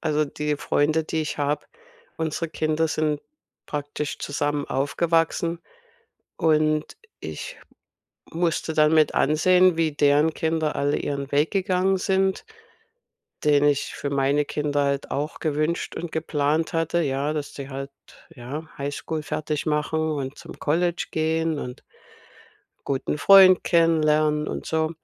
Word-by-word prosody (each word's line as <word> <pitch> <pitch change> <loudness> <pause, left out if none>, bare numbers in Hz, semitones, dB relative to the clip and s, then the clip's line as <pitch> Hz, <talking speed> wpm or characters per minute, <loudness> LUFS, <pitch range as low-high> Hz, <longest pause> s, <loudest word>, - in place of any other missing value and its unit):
Also, 155 -1 +1
die 150 +1 -3
Freunde, 155 +2 +1
die 160 0 -2
ich 150 - -5
habe 145 +1 -1 0.5
unsere 160 +1 -2
Kinder 155 +1 0
sind 155 -2 -1 0.5
praktisch 145 0 -4
zusammen 145 0 -2
aufgewachsen 165 +4 0 0.8
und 155 -1 +1 0.2
ich - - -7 0.7
musste 165 -1 -1
dann 155 0 +4
mit 155 -1 +3
ansehen, 180 +4 +4
wie 165 -1 +1
deren 145 +2 +3
Kinder 160 -1 -1
alle 145 +1 +1
ihren 140 -1 -3
Weg 145 +3 +2
gegangen 190 -1 +1
sind, 190 - 0 1.0
den 145 -1 +4
ich 145 -1 +1
für 140 - -4
meine 140 +1 +2
Kinder 145 -1 -1
halt 140 0 -1
auch 150 +2 -3
gewünscht 155 +2 -1
und 170 -1 -5
geplant 155 0 0
hatte 165 +1 +1
ja, 140 0 -1
dass 150 -2 -5
sie 140 0 -7
halt, 135 +1 -6 0.5
ja, 145 +6 -7
Highschool 145 +3 -4
fertig 155 0 -3
machen 150 +1 0
und 140 -1 -4
zum - - -10
College 170 +3 0
gehen 160 0 0
und 125 -3 -7 1.0
guten 140 +2 -1
Freund 185 +3 +7
kennenlernen 155 -3 +2
und - - -5
so. 160 0 0
155 Hz, 130 wpm, -24 LUFS, 145-160 Hz, 1.0 s, Freund